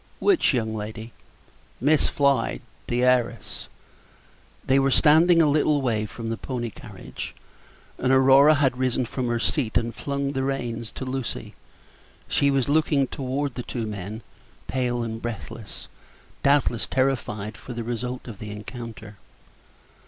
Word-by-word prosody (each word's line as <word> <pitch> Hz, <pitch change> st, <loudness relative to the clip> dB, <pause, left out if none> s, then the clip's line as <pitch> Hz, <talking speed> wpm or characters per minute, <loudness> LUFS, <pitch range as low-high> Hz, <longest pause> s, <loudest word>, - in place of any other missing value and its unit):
"Which 390 Hz, -5 st, +3 dB
young 110 Hz, -5 st, -1 dB
lady?" 110 Hz, +2 st, -6 dB, 0.7 s
"Miss 145 Hz, +4 st, +3 dB
Floyd 135 Hz, -, +1 dB, 0.3 s
the 120 Hz, +1 st, 0 dB
heiress." 125 Hz, -1 st, 0 dB, 1.0 s
They 135 Hz, +1 st, +4 dB
were 135 Hz, 0 st, +3 dB
standing 165 Hz, +5 st, +6 dB
a -, -, +4 dB
little 150 Hz, 0 st, +3 dB
way 110 Hz, -5 st, 0 dB
from 115 Hz, +1 st, -6 dB
the 115 Hz, -, -2 dB
pony 120 Hz, -3 st, -4 dB
carriage. -, -, -9 dB, 0.6 s
Aurora 135 Hz, +3 st, +6 dB
had 135 Hz, -3 st, +1 dB
risen 130 Hz, -1 st, +1 dB
from 125 Hz, +1 st, -3 dB
her 120 Hz, 0 st, +1 dB
seat 120 Hz, -1 st, 0 dB
and 115 Hz, 0 st, -2 dB
flung 140 Hz, 0 st, -2 dB
the 135 Hz, -1 st, -2 dB
reins 120 Hz, -4 st, -3 dB
to 130 Hz, -, -6 dB
Lucy; 130 Hz, -, -4 dB, 0.7 s
she 140 Hz, -, +2 dB
was 135 Hz, -2 st, +1 dB
looking 145 Hz, -1 st, +3 dB
toward 135 Hz, 0 st, -3 dB
the 125 Hz, -, -4 dB
two 120 Hz, -1 st, -4 dB
men, 105 Hz, +1 st, -6 dB, 0.4 s
pale 120 Hz, -2 st, -1 dB
and 115 Hz, 0 st, -5 dB
breathless, 115 Hz, -1 st, -7 dB, 0.5 s
doubtless 125 Hz, -9 st, +2 dB
terrified 120 Hz, -6 st, -1 dB
for 125 Hz, -, -9 dB
the 120 Hz, 0 st, -4 dB
result 125 Hz, +2 st, -4 dB
of 110 Hz, -5 st, -8 dB
the 105 Hz, -, -7 dB
encounter. 110 Hz, 0 st, -8 dB
125 Hz, 140 wpm, -25 LUFS, 115-135 Hz, 1.0 s, standing